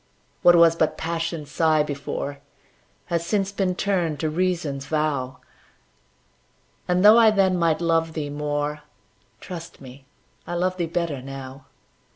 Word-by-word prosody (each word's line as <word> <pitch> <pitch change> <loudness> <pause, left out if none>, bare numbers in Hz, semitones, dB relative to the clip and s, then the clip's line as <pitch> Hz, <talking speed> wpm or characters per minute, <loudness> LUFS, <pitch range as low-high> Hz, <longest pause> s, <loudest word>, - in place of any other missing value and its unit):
What 175 - +7
was 170 -1 +6
but 160 -2 0
Passion's 165 -2 -4
sigh 155 0 +3
before, 140 -1 -5 0.7
Has 170 -1 +1
since 195 +2 -1
been 190 -2 -1
turned 175 -7 -1
to 155 - -1
Reason's 165 -5 -2
vow; 145 -5 -1 1.5
And, 180 +2 +2
though 215 +2 +9
I 225 -1 +7
then 195 -3 +2
might 165 -2 +1
love 165 -1 +1
thee 150 -3 -4
more, 145 0 -3 0.6
Trust 170 +2 -9
me, 135 0 -13 0.4
I 175 - -4
love 185 +1 -1
thee 170 -2 -1
better 165 -5 -2
now. 135 0 -9
165 Hz, 140 wpm, -23 LUFS, 145-175 Hz, 1.5 s, though